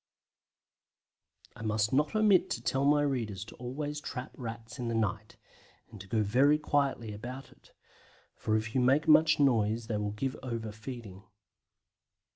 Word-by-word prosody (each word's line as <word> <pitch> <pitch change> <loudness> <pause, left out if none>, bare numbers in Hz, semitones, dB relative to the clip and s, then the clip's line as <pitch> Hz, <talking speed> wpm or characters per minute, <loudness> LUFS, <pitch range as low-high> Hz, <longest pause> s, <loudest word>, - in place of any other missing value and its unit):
I - - -11
must 110 0 0
not 150 +7 +2
omit 210 -4 +4
to 120 - -3
tell 135 +3 +1
my 145 +1 +4
readers 110 -8 -2
to - - -12
always 145 +4 -4
trap 125 -3 -6
Rats 115 0 -7
in 120 - -3
the 115 - -1
night, 105 -1 -2 0.5
and 105 -4 -10
to 100 - -11
go 110 +2 +1
very 135 +8 +4
quietly 140 -7 0
about 125 +6 -8
it, - - -22 0.6
for 110 0 0
if 110 +1 -4
you 130 - +2
make 135 +5 +3
much 155 0 +6
noise 115 -5 +2
they 110 -2 -2
will 105 0 -2
give 130 +5 -3
over 115 -4 -4
feeding. 110 -3 -9
120 Hz, 160 wpm, -30 LUFS, 110-140 Hz, 0.6 s, much